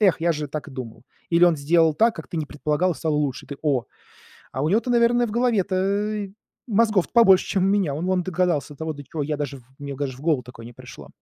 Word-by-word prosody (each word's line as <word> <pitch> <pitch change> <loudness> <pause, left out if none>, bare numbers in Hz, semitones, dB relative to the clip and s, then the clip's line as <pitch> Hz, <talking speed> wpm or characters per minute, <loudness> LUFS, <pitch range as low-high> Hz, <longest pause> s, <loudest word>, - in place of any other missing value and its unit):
"Эх, 195 -6 +3
я 170 0 +2
же 150 -1 -4
так 150 +2 -5
и 145 - -11
думал". 125 -3 -8 0.3
Или 170 +1 +5
он 175 -2 +4
сделал 160 +2 +3
так, 225 +7 +2
как - - -8
ты - - -7
не 155 -2 -2
предполагал, 150 +5 0
и - - -10
стало 160 -2 -1
лучше. 145 -3 -2
И - - -22
ты: 140 - -5
"О! 140 -6 +1 0.7
А 130 - -3
у - - +1
него-то, 225 +7 +1
наверное, 240 0 +3
в - - -6
голове-то 205 -2 0 0.4
мозгов-то 215 -4 +2
побольше, 195 -6 +6
чем 195 - 0
у - - +3
меня. 195 -8 +1
Он 155 +4 -4
вон 185 -1 +1
догадался, 175 -6 -1
до - - -22
того 160 -1 -3
до 145 0 -10
чего 155 +2 -4
я 150 +1 -2
даже 145 -2 -4
в 125 - -20
мне 140 -1 -6
даже 135 -2 -4
в - - -14
голову 150 -4 +1
такое 115 -1 -12
не 120 - -10
пришло". - - -12
165 Hz, 255 wpm, -23 LUFS, 145-200 Hz, 0.7 s, побольше